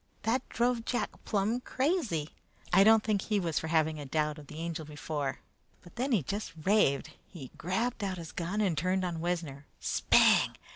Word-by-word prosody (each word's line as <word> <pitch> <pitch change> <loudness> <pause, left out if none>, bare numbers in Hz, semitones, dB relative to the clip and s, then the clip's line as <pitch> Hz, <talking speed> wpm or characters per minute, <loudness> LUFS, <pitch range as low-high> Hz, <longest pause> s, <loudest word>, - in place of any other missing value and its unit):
That 245 +4 0
drove 240 0 +1
Jack 245 +1 -1
plum 215 +3 0
crazy. 255 - -1 0.4
"I 195 +2 +7
don't 220 +1 +6
think 210 -3 +1
he 210 0 0
was 165 -5 0
for 160 - -5
having 160 -1 +1
a 145 - -6
doubt 150 +1 -1
of 145 - -13
the 150 - -10
Angel 165 0 -4
before, 145 -2 -4 0.4
but 175 - -16
then 260 +3 -1
he 210 - +3
just 200 +9 -4
raved. 185 -8 +2 0.2
He 140 -9 -10
grabbed 205 +7 -2
out 190 -2 -2
his 165 -2 -8
gun 185 +4 -2
and 190 -6 +1
turned 185 +4 0
on 170 -2 -3
Wessner. 165 -5 -3
Spang! - - +4
180 Hz, 185 wpm, -30 LUFS, 155-215 Hz, 0.4 s, I